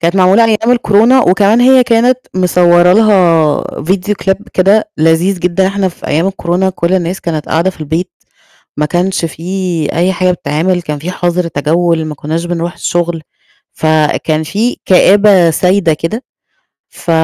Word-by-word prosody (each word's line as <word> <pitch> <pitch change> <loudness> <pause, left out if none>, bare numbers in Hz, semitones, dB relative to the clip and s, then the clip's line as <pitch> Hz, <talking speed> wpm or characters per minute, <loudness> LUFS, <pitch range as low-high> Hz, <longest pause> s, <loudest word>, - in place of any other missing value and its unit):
كانت 170 +3 0
معمولة 190 +4 +4
أيام 225 +2 +1
الكورونا، 235 +2 +3
وكمان 200 +4 +2
هي 260 +1 +5
كانت 240 +2 +2 0.2
مصوره 180 -1 +3
لها 180 -8 +3 0.2
Video 190 +5 -1
Clip 195 +1 0
كده 205 +3 +2
لذيذ 165 +4 +1
جدًا، 180 +2 0
إحنا 195 0 -1
في 175 - -11
أيام 160 +5 0
الكورونا 190 0 -1
كُلّ 175 0 -2
الناس 180 0 -2
كانت 155 -3 -4
قاعدة 170 +4 0
في 175 - -18
البيت، 160 +5 -3 0.7
ما 150 - +1
كانش 180 +2 -1
في 170 -1 -4
أي 180 +3 +1
حاجة 185 0 0
بتتعمل، 175 +2 -2
كان 150 -3 -5
في 165 +5 -6
حظر 175 -1 -2
تجوّل، 165 +3 0
ما 155 -1 -6
كناش 160 +4 -4
بنروح 175 0 -4
الشُّغل، 170 -2 -3 0.5
فكان 155 0 0
في 210 +10 -2
كآبة 190 -1 +4
سايدة 180 0 +1
كده، 165 - -5 0.6
ف - - -7
180 Hz, 155 wpm, -12 LUFS, 165-195 Hz, 0.7 s, هي